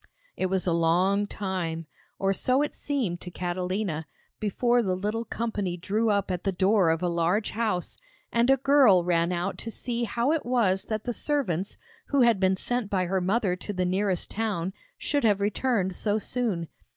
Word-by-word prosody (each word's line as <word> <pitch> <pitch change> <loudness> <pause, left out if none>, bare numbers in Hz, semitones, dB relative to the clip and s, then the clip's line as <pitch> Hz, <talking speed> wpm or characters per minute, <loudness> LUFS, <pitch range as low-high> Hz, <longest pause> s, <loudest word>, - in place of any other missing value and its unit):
It 185 - 0
was 190 0 0
a 175 - +2
long 180 +5 +2
time 180 -6 -3 0.3
or 195 0 +1
it 255 +9 +1
seemed 250 -12 -2
so - - -8
to 180 - -6
Catalina 180 -2 -3 0.3
before 240 +4 +2
the 190 -5 0
little 210 +5 -2
company 205 -6 -2
drew 210 +6 0
up 200 -2 +1
at 180 -1 -3
the 195 - +1
door 190 -1 +3
of 165 +2 0
a - - +2
large 170 +5 +1
house, 210 -6 -2 0.3
and 235 +2 +2
a 270 - +6
girl 265 -9 +5
ran 170 0 +1
out 180 +2 -2
to 230 - -5
see 235 +1 -3
how 235 +5 0
it 320 -1 0
was 225 -7 +1
that 215 -1 -3
the 245 - -2
servants 205 - -1 0.3
who 280 -2 +2
had 235 -4 +4
been 190 0 +3
sent 245 0 -1
by 185 -2 +1
her 190 +1 0
mother 195 0 +1
to 205 - -5
the 185 -1 0
nearest 185 0 0
town 195 -5 -2 0.2
should 290 -1 0
have 205 -3 +3
returned 205 -1 0
so 205 +3 0
soon. 215 -6 -2
200 Hz, 190 wpm, -27 LUFS, 180-230 Hz, 0.3 s, a